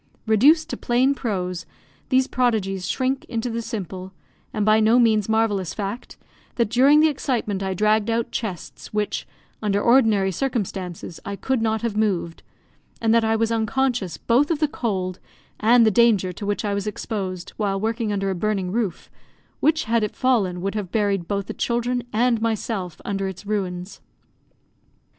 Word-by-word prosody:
Reduced 280 +9 +5
to - - -3
plain 255 +3 +2
prose, 185 -9 -3 0.4
these 260 0 +4
prodigies 215 -8 0
shrink 260 +1 0
into 235 0 -3
the 230 +1 -2
simple, 190 -5 -6 0.4
and 210 -1 -1
by 215 0 +5
no 220 +2 +4
means 220 -4 +3
marvellous 210 -5 +1
fact, 205 +3 -5 0.4
that 235 -3 0
during 275 +5 +6
the 315 - +6
excitement 240 -9 -1
I 190 -1 -2
dragged 215 +2 +2
out 230 0 -1
chests 195 -7 -6
which, 210 -9 -1 0.3
under 205 -2 +1
ordinary 220 -5 +4
circumstances, 190 -8 -3
I 200 - -4
could 260 +3 -1
not 220 0 0
have 230 -3 -1
moved; 190 -6 -1 0.6
and 225 -1 +2
that 230 0 +4
I 220 0 +2
was 225 0 +1
unconscious, 230 -3 0
both 255 +5 +2
of 330 - +1
the 305 0 +2
cold 190 -9 -3 0.4
and 230 +2 +5
the 220 - +4
danger 210 -5 +3
to 200 - -6
which 205 +1 -1
I 205 - 0
was 200 +1 -2
exposed 190 -4 -4
while 200 -2 0
working 225 +1 -1
under 195 -1 -1
a - - 0
burning 195 -1 -1
roof, 210 -5 -3 0.5
which, 315 +1 +2
had 230 0 +1
it 210 - -3
fallen, 205 -9 +1
would 195 - -1
have 205 -4 -4
buried 200 -5 0
both 200 -1 -2
the - - -5
children 245 +1 -1
and 230 0 +2
myself 215 -6 -2
under 195 -1 -2
its 190 +1 -8
ruins. 190 -3 -3
215 Hz, 170 wpm, -23 LUFS, 195-235 Hz, 0.6 s, during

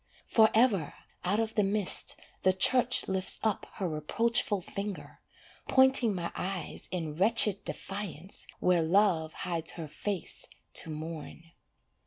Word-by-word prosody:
Forever, 220 - +3 0.3
out 200 +4 0
of 225 -1 -2
the 210 - +2
mist 200 -1 +3 0.2
the 185 - +3
church 250 +6 +4
lifts 190 0 -3
up 220 -3 -1
her 190 - -2
reproachful 205 +7 0
finger, 200 +2 -7 0.5
Pointing 260 -5 +4
my 170 -1 -4
eyes 185 -3 -5
in 165 -4 -4
wretched 200 +2 +4
defiance 195 -2 -6
where 180 -2 +2
love 165 -2 +2
hides 165 -2 -3
her 165 -2 -7
face 195 +4 -5 0.3
to - - +3
mourn. 160 +1 -8
190 Hz, 125 wpm, -29 LUFS, 165-215 Hz, 0.5 s, church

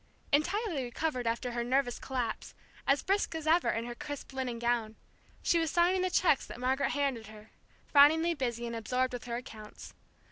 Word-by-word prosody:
Entirely 340 - +1
recovered 250 0 -2
after 235 +2 -1
her 240 0 -2
nervous 250 0 0
collapse, 250 -4 -4 0.3
as 275 +1 +3
brisk 390 -3 0
as 320 -1 -4
ever 330 +3 +3
in 225 +1 -1
her 240 - -5
crisp 285 +2 -7
linen 255 -3 -3
gown, 235 -2 -1 0.5
she 340 - +3
was 325 -1 0
signing 350 +3 +3
the 370 - +1
cheques 360 -5 +2
that - - -9
Margaret 265 +2 +1
handed 270 -6 -1
her, 215 0 -14 0.3
frowningly 320 +4 +5
busy 240 -5 -3
and 235 0 -4
absorbed 250 +3 -1
with 245 0 -6
her 235 -1 -3
accounts. 220 -3 -9
255 Hz, 180 wpm, -31 LUFS, 235-310 Hz, 0.5 s, frowningly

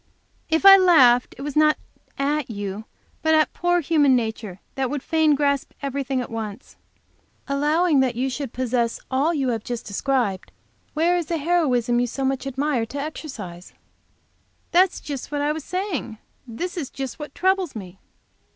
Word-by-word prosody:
"If 320 +4 +1
I 390 0 +11
laughed 265 -10 +5
it 275 - -7
was 290 -1 -5
not 305 0 +4 0.4
at 285 0 -1
you, 205 0 -5 0.4
but 315 0 +3
at 310 -1 +2
poor 350 0 +1
human 290 -4 +3
nature 220 -5 -3
that 265 -2 -1
would 285 -2 -4
fain 315 -2 +3
grasp 280 -1 0
everything 275 -1 -2
at 245 - -7
once. 220 0 -6 0.7
Allowing 295 +3 +2
that 255 -2 +1
you 255 +3 0
should 270 -1 -4
possess 240 -2 -1
all 275 +5 +2
you 275 -6 0
have 225 -3 -2
just 240 -1 -5
described, 205 -3 -1 0.4
where 335 +3 +2
is 340 -3 -3
the 335 - -1
heroism 270 -7 +1
you 245 - +1
so 270 +3 -3
much 270 0 -1
admire 270 -3 -1
for 285 - -5
exercise?" 235 - -7 1.0
"That 365 +1 +5
is - - -9
just 285 -3 -6
what 290 -1 -1
I 295 +1 +1
was 310 0 -4
saying. 365 - -4 0.3
That 350 +11 -5
is 290 -6 -3
just 270 +1 -6
what 295 -1 -8
troubles 375 -5 +1
me." 190 -3 -9
275 Hz, 170 wpm, -23 LUFS, 240-315 Hz, 1.0 s, I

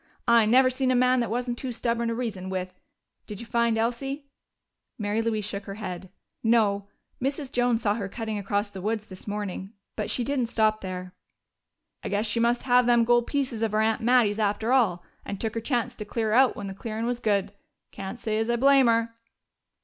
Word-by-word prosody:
"I 235 -2 +5
never 255 +3 +5
seen 260 0 0
a 255 - +3
man 250 +1 +4
that 235 -3 -1
wasn't 240 +1 -2
too 260 - -3
stubborn 235 0 -1
to 230 - -1
reason 205 -6 -4
with. 185 -1 -3 0.5
Did 205 -2 -7
you 235 - -7
find 235 -1 +1
Elsie?" 270 +5 -2 0.7
Mary 210 +1 -1
Louise 220 -2 -1
shook 200 -1 -4
her 195 - -6
head. 190 -3 -6 0.3
"No. 210 -3 +2 0.3
Mrs. 275 +1 -2
Jones 245 -1 +1
saw 205 -2 +3
her 205 -3 -4
cutting 220 0 -4
across 205 +1 -1
the 190 - -8
woods 215 +1 -2
this 185 -1 -12
morning. 205 -1 -4 0.2
But - - -3
she 245 - 0
didn't 260 -1 0
stop 215 -2 +1
there." 185 -1 -6 0.9
"I - - -3
guess 205 +2 0
she 225 +2 0
must 235 +1 +2
have 250 -1 +4
them 240 -1 +5
gold 240 0 +3
pieces 265 -6 -1
of 225 -2 0
her 215 - +3
aunt 220 0 +1
Mattie's 225 -3 +3
after 215 +3 +1
all, 190 -10 +2 0.2
and 200 - -6
took 220 -2 -2
her 230 - -3
chance 245 0 -1
to 225 - -7
clear 215 +1 -1
out 260 +2 +5
when 205 - -6
the 195 - -5
clearin' 220 +2 -4
was 240 0 -1
good. 200 -3 0 0.4
Can't 195 +4 -6
say 215 -1 -1
as 225 +1 -1
I 235 - +3
blame 270 +1 +5
her!" 230 0 +2
225 Hz, 210 wpm, -26 LUFS, 205-245 Hz, 0.9 s, I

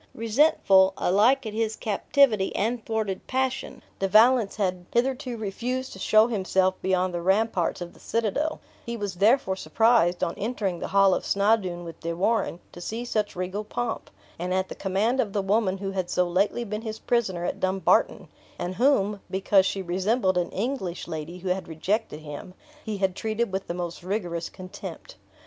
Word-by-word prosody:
Resentful, 220 -5 +4
alike 230 +8 +3
at 215 - -4
his 220 0 -1
captivity 215 -1 +2
and 230 +2 -1
thwarted 220 -4 -3
passion, 260 0 -2 0.2
De 195 - +1
Valence 220 +2 +5
had 185 -4 -2
hitherto 255 0 0
refused 245 +5 -3
to 190 - -10
show 215 +3 +5
himself 190 -4 +1
beyond 185 -1 +1
the 175 - -2
ramparts 190 -1 +1
of 175 0 -6
the - - -19
citadel; 230 +8 -1 0.2
he 235 0 -5
was 205 -3 -3
therefore 200 +1 +3
surprised, 220 -4 +2
on 170 - 0
entering 200 -6 -2
the - - -4
hall 195 -1 +4
of - - -1
Snawdoun 200 -4 +1
with 165 -2 -9
De 170 0 -3
Warenne, 200 0 0
to 175 - -11
see 225 +6 -4
such 215 -3 -1
regal 185 +3 -3
pomp; 230 +2 -4 0.3
and 180 +2 -1
at 190 0 0
the - - -5
command 205 +7 0
of 205 -6 0
the 205 - +1
woman 195 -1 +1
who 195 0 -4
had 185 -2 -3
so 180 0 +1
lately 195 +7 +1
been 210 -1 -4
his 220 -1 -5
prisoner 195 -9 0
at - - -3
Dumbarton, 190 -1 +2 0.3
and 180 - -3
whom 210 -3 +2
(because 190 0 +3
she 195 - -2
resembled 185 +3 +1
an 175 - -1
English 200 -5 -3
lady 160 +2 -6
who 185 +1 -5
had 185 +1 -1
rejected 165 +1 -2
him) 155 +4 -9 0.3
he 215 -2 -4
had 190 -2 0
treated 220 0 -2
with 190 +1 -3
the 170 - -3
most 175 -1 -5
rigorous 175 -3 -3
contempt. 185 - -9
200 Hz, 180 wpm, -26 LUFS, 185-225 Hz, 0.3 s, Valence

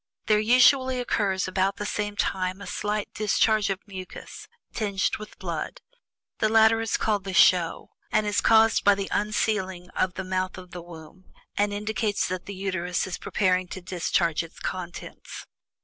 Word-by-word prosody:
There 215 -1 +3
usually 255 +3 +4
occurs 200 -6 0
about 190 +1 0
the 205 - -5
same 205 0 -2
time 185 -1 -1
a 200 - -8
slight 210 0 -3
discharge 215 0 +2
of 195 +1 -4
mucus 185 -2 -9 0.3
tinged 200 -4 -1
with 210 - -11
blood. - - -5 0.6
The 215 - +2
latter 225 0 +5
is 225 - 0
called 210 -3 0
"the 190 -1 -5
show," 170 -1 +4 0.2
and 215 0 +2
is 205 0 +1
caused 225 0 +5
by 205 0 +6
the 195 0 -4
unsealing 190 -4 -1
of 185 -1 -1
the 190 - -4
mouth 185 0 -2
of 180 -1 -11
the 175 - -7
womb, 170 +2 -13 0.3
and 205 0 +1
indicates 210 0 -1
that 185 -1 -5
the 200 - -6
Uterus 185 -2 -2
is 185 - -5
preparing 185 -2 +1
to 185 - -7
discharge 175 -2 0
its 165 -1 -11
contents. 180 -2 -7
195 Hz, 165 wpm, -26 LUFS, 185-215 Hz, 0.6 s, by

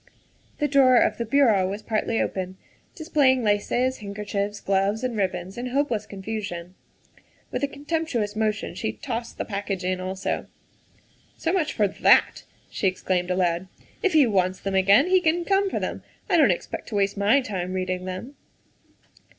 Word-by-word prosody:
The 295 - +1
drawer 270 -3 +5
of - - +2
the 235 - -1
bureau 220 -8 +3
was 200 +2 -5
partly 225 0 -1
open, 185 0 -3 0.4
displaying 280 - +2
laces, 240 +5 +1
handkerchiefs, 205 0 -4
gloves, 200 +4 0
and 250 -2 -1
ribbons 190 0 -2
in 250 - -3
hopeless 250 -4 -1
con 195 -1 -9
fusion. 190 -5 -5 0.8
With - - -2
a - - +3
contemptuous 285 -7 -2
motion 215 -1 -1
she 220 - -3
tossed 235 -3 -5
the - - -3
package 200 -2 -3
in 185 0 -1
also. 190 +1 -3 0.4
" - - -35
So 330 - -1
much 335 -6 0
for 210 - +2
that," 190 - +3 0.3
she 195 - 0
exclaimed 185 -1 -1
aloud. 180 0 0 0.2
" - - -31
If 380 - +1
he 305 -3 +6
wants 185 -4 +1
them 195 - -3
again, 195 +7 +5
he 370 0 +3
can 340 +1 +1
come 390 +1 +2
for - - -2
them. - - -4 0.3
I - - +2
don - - +6
't - - +4
expect - - -8
to 220 - -5
waste 200 -1 +1
my 205 +7 +4
time 185 -8 -4
reading 185 -1 -2
them." 185 +9 -6
210 Hz, 175 wpm, -25 LUFS, 190-260 Hz, 0.8 s, he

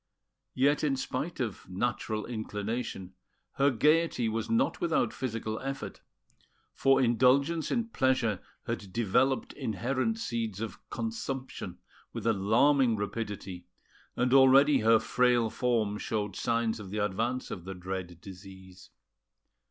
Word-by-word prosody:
Yet, 140 +4 +2
in 140 -3 +2
spite 140 +5 -4
of 110 -7 -4
natural 110 +2 -2
inclination, 110 -3 -4 0.4
her 140 +1 +4
gaiety 150 -1 +2
was 110 0 -2
not 115 - +1
without 165 -9 +1
physical 110 -3 -3
effort; 135 +1 -6 0.7
for 135 0 +3
indulgence 135 +6 +3
in 235 -2 -1
pleasure 130 - +1 0.2
had 100 -2 -4
developed 120 +5 +1
inherent 130 - -1
seeds 115 - -3
of 115 -1 -5
consumption 135 - -5 0.4
with - - -6
alarming 115 +5 +3
rapidity, 100 -4 -5 0.5
and 125 +1 +1
already 135 +2 +6
her 115 +1 +5
frail 120 -1 +2
form 110 -5 0
showed 105 -3 -3
signs 115 -1 0
of 100 -3 -8
the 105 - -5
advance 110 +5 -1
of 90 - -6
the 95 +1 -7
dread 90 -1 -6
disease. 95 -1 -12
115 Hz, 120 wpm, -29 LUFS, 105-135 Hz, 0.7 s, already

